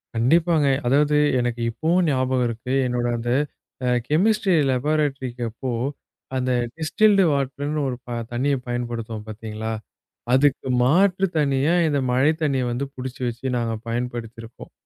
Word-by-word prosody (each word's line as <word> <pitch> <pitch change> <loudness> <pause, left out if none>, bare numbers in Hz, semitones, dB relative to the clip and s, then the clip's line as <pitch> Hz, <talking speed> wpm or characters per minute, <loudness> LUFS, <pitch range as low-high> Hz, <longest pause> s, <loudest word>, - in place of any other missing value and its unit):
கண்டிப்பாங்க. 160 +5 +3 0.2
அதாவது 150 +3 +3 0.2
எனக்கு 120 -1 -2
இப்பவும் 170 +8 +1
ஞாபகம் 130 -2 +1
இருக்கு. 120 +3 -4
என்னோட 120 -1 -1
அந்த 120 +1 -4 0.6
அ - - +1 0.2
கெமிஸ்ட்ரி 195 +5 +2 0.2
லாபரடோரிக்கு 135 -2 -1
அப்போ, 125 +4 -6 0.7
அந்த 130 0 0 0.3
டிஸ்டில்டு 195 +5 +3
வாட்டர்ன்னு 145 +2 -1
ஒரு 130 - -2
ப - - -10 0.2
தண்ணிய 135 +4 +1
பயன்படுத்துவோம் 115 -3 -4
பாத்தீங்களா? 110 0 -5 0.6
அதுக்கு 135 0 +3 0.2
மாற்றுத் 185 +6 +3
தண்ணியா, 140 +1 +2
இந்த 145 -2 +1
மழைத் 145 +6 +2
தண்ணியை 135 -4 +1
வந்து 125 +4 -2
புடிச்சு 130 0 -7
வச்சு 120 +2 -6
நாங்க 115 -1 -1
பயன்படுத்தி 120 -1 -4
இருப்போம். 115 +1 -12
130 Hz, 130 wpm, -23 LUFS, 120-150 Hz, 0.7 s, கண்டிப்பாங்க